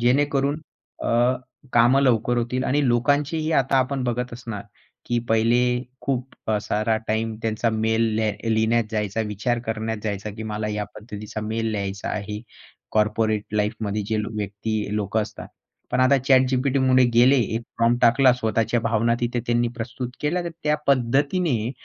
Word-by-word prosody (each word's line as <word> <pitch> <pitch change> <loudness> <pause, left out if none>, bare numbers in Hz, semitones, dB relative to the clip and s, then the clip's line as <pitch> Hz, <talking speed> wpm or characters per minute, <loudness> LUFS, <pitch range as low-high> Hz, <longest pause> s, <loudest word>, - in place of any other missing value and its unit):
जेणेकरून 140 +4 +2 0.4
अ, - - -2 0.7
कामं 120 +3 +5
लवकर 120 -2 +2
होतील 125 +2 -1
आणि 140 +1 +1
लोकांचीही 145 +6 +1
आता 135 -2 +2
आपण 130 +1 0
बघत 125 0 -2
असणार 115 -4 -6 0.4
की 120 0 +1
पहिले 115 +2 +3 0.4
खूप 130 -1 -3 0.2
अ, 105 - +2
सारा 110 +1 0
टाईम 110 0 -1
त्यांचा 115 +1 0
मेल 110 +1 +1
लेह 110 -2 0 0.2
लिहिण्यात 110 +1 +2
जायचा, 105 -1 -1
विचार 110 +3 -1
करण्यात 110 0 -2
जायचा 105 0 -3
की 110 - -6
मला 105 0 -3
या 105 0 -2
पद्धतीचा 105 -1 -7
मेल 110 +1 -2
लिहायचा 100 -1 -3
आहे. 105 0 -4 0.5
कॉर्पोरेट 105 0 +1
लाईफमध्ये 105 0 -1
जे 110 - 0
व्यक्ती 105 0 -3
लोक 105 0 -2
असतात. 110 - -4 0.4
पण 125 - +1
आता 130 +2 +5
ChatGPTमध्ये 130 0 +4
गेले, 125 +4 +6
एक 115 -1 0 0.2
फॉर्म 115 +1 +3
टाकला, 130 +2 +6
स्वतःच्या 115 0 0
भावना 115 +1 +1
तिथे 120 0 -1
त्यांनी 120 0 +2
प्रस्तुत 125 +2 -5
केल्या, 175 +4 0
तर 170 - -3
त्या 150 0 +3
पद्धतीने 135 - +1
115 Hz, 150 wpm, -23 LUFS, 110-130 Hz, 0.7 s, गेले